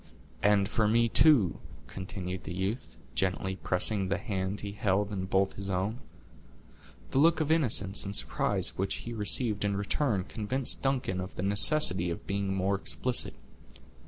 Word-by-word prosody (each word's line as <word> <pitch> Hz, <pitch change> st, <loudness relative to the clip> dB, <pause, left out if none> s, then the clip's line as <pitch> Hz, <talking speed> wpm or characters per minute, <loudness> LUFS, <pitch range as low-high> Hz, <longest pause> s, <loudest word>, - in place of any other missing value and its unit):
"And 100 Hz, -1 st, +2 dB
for 110 Hz, 0 st, 0 dB
me, 115 Hz, +2 st, +2 dB
too," 125 Hz, -, +4 dB, 0.3 s
continued 95 Hz, -1 st, -7 dB
the 85 Hz, -, -6 dB
youth, 95 Hz, +7 st, -4 dB, 0.2 s
gently 95 Hz, 0 st, -1 dB
pressing 95 Hz, +2 st, +2 dB
the 95 Hz, +1 st, -1 dB
hand 100 Hz, -1 st, -4 dB
he 100 Hz, -, -6 dB
held 105 Hz, -1 st, -1 dB
in 95 Hz, -2 st, -4 dB
both 95 Hz, +1 st, 0 dB
his 100 Hz, -1 st, -7 dB
own. 95 Hz, +5 st, -2 dB, 1.1 s
The 135 Hz, -, +1 dB
look 165 Hz, +3 st, +4 dB
of 155 Hz, -1 st, -1 dB
innocence 110 Hz, -, +1 dB
and 100 Hz, 0 st, -3 dB
surprise 105 Hz, -, +1 dB
which 95 Hz, -, -1 dB
he 120 Hz, -, -6 dB
received 105 Hz, 0 st, +1 dB
in 100 Hz, -1 st, -1 dB
return 100 Hz, 0 st, -1 dB
convinced 120 Hz, +7 st, -2 dB
Duncan 125 Hz, -9 st, -2 dB
of 95 Hz, +1 st, -8 dB
the 90 Hz, -, -5 dB
necessity 100 Hz, -, +4 dB
of 85 Hz, -, -6 dB
being 100 Hz, 0 st, -3 dB
more 95 Hz, +1 st, -1 dB
explicit. 120 Hz, +5 st, +1 dB
100 Hz, 160 wpm, -28 LUFS, 95-115 Hz, 1.1 s, too